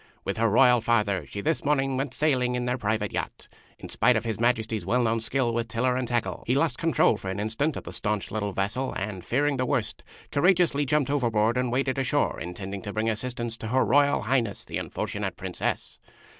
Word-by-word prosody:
With - - -2
her 115 0 +3
Royal 125 +2 +5
Father 105 - +1
she 100 - -5
this 160 +8 0
morning 135 -2 +1
went 135 0 -3
sailing 125 -5 +1
in 125 0 -1
their 125 +1 -1
private 110 -1 -1
yacht. - - -4 0.3
In - - -9
spite - - +3
of - - -1
His 110 -3 -2
Majesty's 115 -2 +1
well 125 +1 +1
known 115 0 +1
skill 120 +1 0
with 115 0 -1
tiller 125 +3 0
and 130 -1 -1
tackle, 120 -1 -2
he 125 - +2
lost 140 -3 +1
control 165 -6 +3
for 95 - -6
an 95 +1 -3
instant 115 +8 -1
of - - -6
the - - -8
stanch 105 -2 -2
little 105 -2 -2
vessel, 105 +8 -2
and, 95 -2 -4
fearing 140 +2 +1
the 130 - 0
worst, 125 -7 -2 0.3
courageously 165 -3 +3
jumped 140 0 +1
overboard 115 -5 +2
and 125 -1 0
waded 135 +1 0
ashore, 140 +2 0
intending 95 +3 -6
to 100 - -5
bring 110 +1 +1
assistance 120 0 -4
to 110 - -6
Her 130 +4 +2
Royal 145 -1 +3
High 130 +5 +3
ness, 105 -4 -6
the - - -4
unfortunate - - -4
Princess. - - -3
120 Hz, 210 wpm, -26 LUFS, 110-135 Hz, 0.3 s, Royal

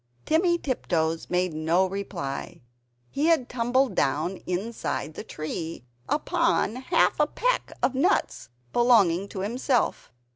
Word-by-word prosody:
Timmy 345 +2 +3
Tiptoes 165 - -1
made 180 -1 0
no 160 +4 +2
reply; 185 -8 -5 0.5
he 295 +3 0
had 320 -7 +3
tumbled 250 +2 +1
down 150 +8 0
inside 185 -4 -3
the - - -7
tree, 160 -1 -5 0.3
upon 335 - +1
half 285 +6 +2
a 300 - +4
peck - - -1
of 265 - +3
nuts 285 - 0 0.2
belonging 200 -7 +4
to 190 - -6
himself. 240 +4 0
220 Hz, 120 wpm, -26 LUFS, 170-275 Hz, 0.5 s, a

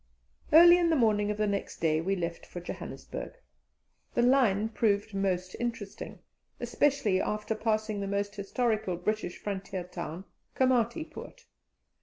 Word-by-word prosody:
Early 345 +3 +9
in 340 -1 +3
the 325 - +3
morning 210 -5 +2
of 210 - -2
the 215 - +1
next 200 -1 -2
day 160 -1 +2
we 195 +4 0
left 170 -2 -4
for 175 - -8
Johannesburg. 175 - -7 0.8
The 240 - +3
line 230 -5 +3
proved 210 -2 0
most 185 -2 -1
interesting, 230 -4 -5 0.4
especially 265 -10 +1
after 210 +1 -2
passing 215 -1 -1
the 200 - -3
almost 200 +1 -1
historical 215 -2 -1
British 195 0 -2
frontier 195 -2 -4
town, 175 0 -7 0.3
Koomati 255 +1 +2
Poort. - - -11
210 Hz, 140 wpm, -29 LUFS, 190-235 Hz, 0.8 s, Early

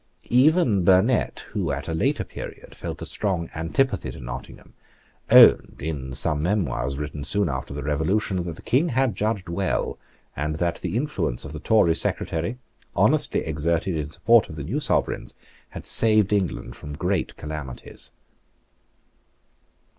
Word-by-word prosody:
Even 125 - +4
Burnet, 95 +7 +3
who 95 -8 -1
at 70 0 -4
a 80 - -2
later 80 - 0
period - - -9
felt - - -6
a - - -5
strong 90 -5 -2
antipathy 85 - 0
to 65 - -8
Nottingham, 60 0 -9 0.6
owned, - - +7
in 70 -4 -4
some 75 +3 0
memoirs 75 - -1
written 75 0 -5
soon 100 +6 +1
after 65 -3 -4
the 70 +1 -5
Revolution, 90 +6 0
that 85 -2 -5
the - - -14
King 145 +8 +2
had 130 -4 +1
judged 105 -2 -1
well, 95 +2 -2 0.4
and 75 +1 -2
that 85 +1 -1
the 90 +5 -2
influence 145 - -2
of - - -8
the 75 - -6
Tory 100 -2 +3
Secretary, 85 +6 -2 0.4
honestly - - +3
exerted 80 +3 -1
in 75 -2 -3
support 115 +8 +3
of 80 - -8
the 75 - -5
new 110 - -2
Sovereigns, 145 - 0 0.3
had - - -9
saved 110 -3 +5
England 90 -11 -1
from 75 - -8
great 90 +4 -2
calamities. 75 -5 -5
85 Hz, 150 wpm, -24 LUFS, 75-105 Hz, 0.6 s, owned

